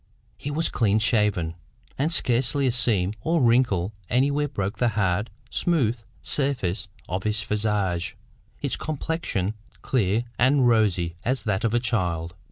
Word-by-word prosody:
He 145 - -6
was 155 +3 0
clean 105 -3 +2
shaven, 105 -7 +2 0.4
and 150 +5 0
scarcely 135 -2 +2
a 130 - +3
seam 110 -5 +1
or 165 +7 +1
wrinkle 115 - +3 0.2
anywhere 140 +4 +2
broke 100 -6 -3
the 120 - +3
hard, 95 +2 +1 0.2
smooth 125 -9 +1 0.2
surface 105 -11 0 0.2
of 95 +1 -2
his 105 +1 0
visage, 100 -6 -1 0.5
its - - 0
complexion 150 - -2 0.3
clear 110 -2 +1 0.2
and 130 +1 +4
rosy 95 -7 +2
as 130 +2 0
that 105 -4 -1
of 115 0 +1
a - - +4
child. 90 -9 -1
110 Hz, 140 wpm, -25 LUFS, 95-130 Hz, 0.5 s, and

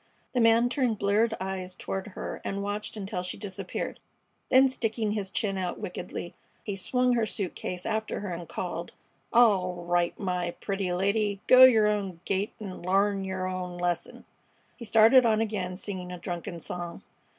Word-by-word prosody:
The 250 - +1
man 230 +1 +5
turned 245 -4 0
bleared 215 +3 +2
eyes 185 -1 -4
toward 190 +2 -4
her - - -5
and 200 0 -3
watched 205 +2 -4
until 195 -3 -3
she 180 0 -5
disappeared. 195 -2 -5 0.5
Then 265 +1 +7
sticking 225 -4 -1
his 205 -2 -2
chin 195 0 -1
out 180 -1 -3
wickedly, 180 -3 -6 0.3
he 205 - -3
slung 250 +6 +1
her 230 -2 +1
suit 195 -4 -3
case 180 0 -5
after 220 -2 -2
her 195 -3 -4
and 170 -1 -7
called: 170 -1 -4 0.4
"All 185 -7 +3
right, 175 0 +1
my 180 -3 -2
pretty 195 -2 -2
lady; 200 +2 +1
go 255 0 +10
yer 225 -4 +6
own 200 -5 -1
gait 195 +3 0
an' 195 -4 -7
l'arn 195 +2 +2
yer 190 -1 -3
own 180 -1 -4
lesson." 175 -1 -2 0.5
He 235 - -9
started 225 +4 +7
on 220 -2 +3
again, 195 -5 -2
singing 185 -3 -5
a 180 - -5
drunken 170 -1 -5
song. 175 +1 -6
195 Hz, 170 wpm, -28 LUFS, 180-220 Hz, 0.5 s, go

